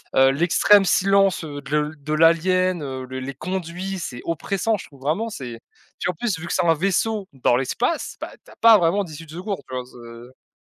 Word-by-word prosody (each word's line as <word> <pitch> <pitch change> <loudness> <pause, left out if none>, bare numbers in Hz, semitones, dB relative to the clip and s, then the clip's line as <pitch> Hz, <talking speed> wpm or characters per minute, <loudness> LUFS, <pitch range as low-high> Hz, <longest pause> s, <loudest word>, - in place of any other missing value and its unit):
Heu, 135 0 +6
l'extrême 175 +7 +4
silence, 195 -1 +3
heu, 145 -2 -7
de 140 0 -12
le 150 +1 -2
de 150 +1 -5
l'alien, 170 +2 +3
heu, 130 -2 -5
les 130 +1 -6
conduits, 185 +4 -4
c'est 125 -8 -6
oppressant. 195 +6 -1
Je - - -9
trouve 140 - -18
vraiment, 165 +12 -1
c'est 125 - -8 0.4
tu - - -5
vois, - - +1
en - - -22
plus 200 +1 -2
vu 160 - -8
que - - -3
c'est 180 - +1
un 165 - +5
vaisseau 195 +4 0
dans 125 -2 +2
l'espace, 235 - -1
bah, - - -5
tu - - -16
as - - -16
pas 230 -1 +7
vraiment 190 +3 +2
d'issue 160 -1 -10
de 155 - -14
secours. 185 +4 -5
Tu 130 - -11
vois? 125 -1 -3
C'est 120 +1 -14
165 Hz, 220 wpm, -22 LUFS, 135-190 Hz, 0.4 s, pas